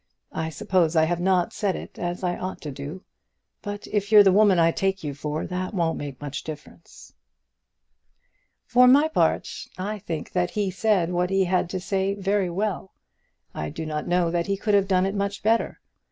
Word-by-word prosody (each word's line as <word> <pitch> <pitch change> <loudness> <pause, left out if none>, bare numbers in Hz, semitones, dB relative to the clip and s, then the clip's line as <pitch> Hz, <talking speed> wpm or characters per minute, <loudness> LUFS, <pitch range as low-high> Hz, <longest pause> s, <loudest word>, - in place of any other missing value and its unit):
I 160 0 -2
suppose 180 -2 +1
I 160 - +5
have 170 +2 0
not 180 -1 +1
said 200 -3 -1
it - - -9
as 175 +1 -3
I 175 -1 0
ought 185 0 -5
to 150 - -5
do, 145 +7 -8 0.6
but 205 -1 -6
if 205 0 -2
you're 210 -1 +9
the 195 - +5
woman 200 -1 +5
I 165 0 +4
take 195 +1 -1
you 145 -2 -3
for 150 +2 -4
that 185 +3 -4
won't 165 -3 0
make 140 -3 -7
much 145 -1 -5
difference." 155 +2 -11 1.5
For 250 0 +5
my 285 +5 +6
part - - +1 0.3
I 205 +3 -4
think 165 -4 -5
that 180 -1 0
he 205 -3 -1
said 190 -3 +1
what 180 0 0
he 195 0 +2
had 180 -1 0
to 185 - -3
say 195 +1 -1
very 200 -1 0
well. 190 +1 -3 0.6
I 75 0 -4
do 160 - -6
not 150 -1 -4
know 175 -1 +2
that 170 0 -1
he 200 0 0
could 210 +1 -1
have 200 -1 +4
done 185 -1 +2
it 195 - -1
much 200 0 -3
better. 225 +2 +1
185 Hz, 195 wpm, -24 LUFS, 165-200 Hz, 1.5 s, you're